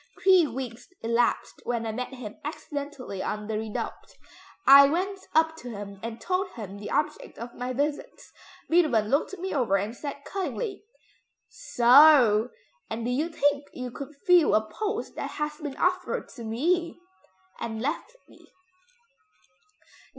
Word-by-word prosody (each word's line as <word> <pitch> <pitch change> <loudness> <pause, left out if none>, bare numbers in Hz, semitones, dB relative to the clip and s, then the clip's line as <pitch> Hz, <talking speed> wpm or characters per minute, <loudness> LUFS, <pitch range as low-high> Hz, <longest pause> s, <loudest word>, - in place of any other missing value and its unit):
Three 370 -4 +6
weeks 245 -3 -6 0.2
elapsed 235 +1 0
when 235 -1 -2
I 220 - -2
met 250 +4 -4
him 220 -5 -9
accidentally 285 -8 -6
on 210 +2 -3
the 220 - -4
Redoubte; 220 -1 -6 0.5
I 275 +1 +9
went 380 +5 -1 0.2
up 320 0 +4
to 250 - -8
him 200 -3 -8
and 230 0 -6
told 370 +1 -1
him 200 -3 -8
the 205 - -7
object 300 0 -2
of 235 +1 -7
my 250 +1 -4
visits. 285 +3 -3 0.3
Beethoven 285 -11 +3
looked 290 +8 0
me 380 +2 -4
over 240 -9 +2
and 205 +4 -3
said 285 +1 -7
cuttingly, 395 +2 -4 0.6
'So! 250 - +6 0.4
and 225 +1 -4
do 245 - -1
you 300 +7 0
think 290 -3 +1
you 250 -1 -6
could 280 +4 -8
fill 355 -5 +5
a 215 0 +1
post 430 - -3
that - - -3
has 300 0 -3
been 290 -3 -6
offered 365 0 0
to 235 - -10
me?' 335 +12 0 0.6
and 225 -1 -4
left 315 - -3
me. - - -19
275 Hz, 150 wpm, -27 LUFS, 230-320 Hz, 0.6 s, I